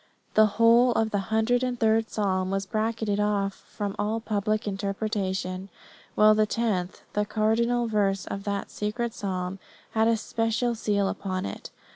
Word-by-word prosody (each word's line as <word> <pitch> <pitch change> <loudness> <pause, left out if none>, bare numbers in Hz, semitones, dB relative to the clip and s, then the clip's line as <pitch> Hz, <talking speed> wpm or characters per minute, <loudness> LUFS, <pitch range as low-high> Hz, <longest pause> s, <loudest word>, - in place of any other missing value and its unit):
The 215 0 +6
whole 235 +2 +6
of 220 -1 +1
the 205 - +1
hundred 220 +3 +2
and 250 -1 -2
third 225 0 +2
psalm 185 -3 0
was 195 0 -1
bracketed 220 -1 -1
off 205 -1 +1
from 200 0 -6
all 215 +2 0
public 215 -1 -1
interpretation; 195 -2 -2 0.5
while 215 0 +6
the 215 0 +3
tenth, 205 -6 -1
the 210 - +1
cardinal 230 +3 +1
verse 200 -3 +1
of 195 - -5
that 200 -1 -3
secret 225 +2 -2
psalm, 185 -1 -3 0.3
had 220 0 +2
a 230 -1 +3
special 225 +2 0
seal 205 -3 0
set - - +1
upon 185 -2 -3
it. 100 - -6
215 Hz, 160 wpm, -26 LUFS, 195-225 Hz, 0.5 s, The